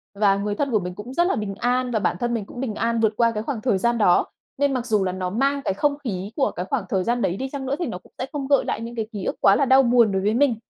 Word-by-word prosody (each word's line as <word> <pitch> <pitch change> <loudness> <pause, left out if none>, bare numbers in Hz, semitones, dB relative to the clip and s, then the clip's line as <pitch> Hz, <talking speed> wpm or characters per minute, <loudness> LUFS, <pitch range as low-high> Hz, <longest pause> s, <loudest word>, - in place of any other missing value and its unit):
và 200 -1 +3
người 205 +1 -2
thân 280 +1 -1
của 215 - +3
mình 180 -1 -6
cũng 240 +5 -8
rất 345 - +3
là - - +1
bình 205 -2 -4
an, 250 +1 0
và 220 - +1
bản 175 - 0
thân 240 0 -1
mình 215 -4 -2
cũng 245 - -10
bình 240 -5 -3
an 230 +1 0
vượt 220 -1 +2
qua 230 -1 +3
cái 215 -1 -4
khoảng 235 -4 -4
thời 210 -6 +1
gian 235 +4 +1
đó. 195 -5 +4 0.3
Nên 280 0 +1
mặc 250 -2 -2
dù 215 -5 +1
là 185 - -1
nó 185 0 -3
mang 275 +7 0
cái 190 - +1
không 285 +7 0
khí 200 -3 -4
của 275 - +1
cái 180 - -5
khoảng 245 -2 -2
thời 190 -2 0
gian 240 +2 0
đấy 180 +2 0
đi 265 0 -4
chăng 275 -1 -5
nữa, 270 - -1
thì 350 - -1
nó 220 - -4
cũng - - -19
sẽ 255 - -3
không 285 -3 -4
gợi 280 0 +3
lại - - -2
những 235 +1 -6
cái 220 -2 -3
ký 200 -4 -5
ức - - -1
quá 195 - +6
là 280 - +2
đau 265 +1 +6
buồn 235 -3 +4
đối 190 0 0
với 210 +2 +1
mình. 255 -1 +3
230 Hz, 335 wpm, -23 LUFS, 200-265 Hz, 0.3 s, quá